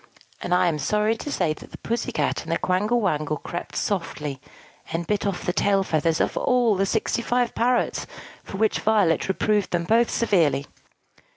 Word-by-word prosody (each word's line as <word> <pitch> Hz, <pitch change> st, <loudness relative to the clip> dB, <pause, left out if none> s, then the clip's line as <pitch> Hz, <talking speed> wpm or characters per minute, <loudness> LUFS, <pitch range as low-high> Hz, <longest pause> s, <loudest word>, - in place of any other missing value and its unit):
And 180 Hz, -, -5 dB
I 180 Hz, -, +4 dB
am 155 Hz, -3 st, 0 dB
sorry 210 Hz, +6 st, +1 dB
to 290 Hz, -, -6 dB
say 175 Hz, -, +1 dB
that -, -, -13 dB
the -, -, -9 dB
Pussy 235 Hz, +2 st, -2 dB
Cat 230 Hz, -, -1 dB
and 165 Hz, -, -7 dB
the 165 Hz, -, +2 dB
Quangle 210 Hz, +6 st, +1 dB
Wangle 155 Hz, -7 st, 0 dB
crept 170 Hz, +4 st, -6 dB
softly, 150 Hz, -8 st, -3 dB, 0.5 s
and 165 Hz, +1 st, -2 dB
bit 205 Hz, +3 st, 0 dB
off 195 Hz, -3 st, -3 dB
the 180 Hz, -, 0 dB
tail 195 Hz, 0 st, +2 dB
feathers 160 Hz, -2 st, 0 dB
of -, -, 0 dB
all 245 Hz, -4 st, +3 dB
the 195 Hz, +1 st, +1 dB
sixty 220 Hz, +3 st, 0 dB
five 245 Hz, +1 st, 0 dB
parrots; 245 Hz, +1 st, 0 dB, 0.4 s
for 195 Hz, -, -7 dB
which 220 Hz, +1 st, +1 dB
Violet 205 Hz, -7 st, +2 dB
reproved 205 Hz, +1 st, +1 dB
them 175 Hz, -1 st, 0 dB
both 230 Hz, +6 st, +3 dB
severely. 155 Hz, -, +2 dB
195 Hz, 185 wpm, -24 LUFS, 165-220 Hz, 0.5 s, I